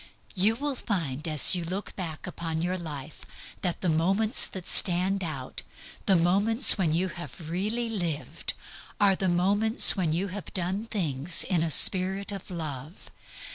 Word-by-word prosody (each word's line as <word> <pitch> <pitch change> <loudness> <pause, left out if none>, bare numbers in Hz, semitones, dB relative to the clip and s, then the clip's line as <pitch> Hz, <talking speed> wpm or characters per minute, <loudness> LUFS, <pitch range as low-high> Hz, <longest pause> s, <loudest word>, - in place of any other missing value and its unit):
You 205 +3 +2
will 285 +3 -3
find 165 - -4
as 155 -3 +7
you 175 - -2
look 185 +5 -6
back 165 -5 -6
upon 165 -2 -4
your 180 +1 -1
life 155 -4 -8 0.4
that 180 -2 -3
the 185 - -1
moments 195 - 0
that 185 -2 -9
stand 190 +1 +2
out, 135 -6 -5 0.5
the 195 - +5
moments 200 +8 +3
when 180 -6 0
you 185 +2 0
have 170 -2 -9
really 215 +7 -2
lived, 175 -9 -4 0.4
are 200 -2 +4
the 190 0 -1
moments 200 +6 +4
when 180 -6 -1
you 185 +5 -1
have 195 +1 -8
done 190 +4 -2
things 170 -5 +1
in 175 -4 0
a 165 - -1
spirit 190 +5 +4
of 200 0 -8
love. 155 -2 -7
180 Hz, 160 wpm, -27 LUFS, 165-200 Hz, 0.5 s, as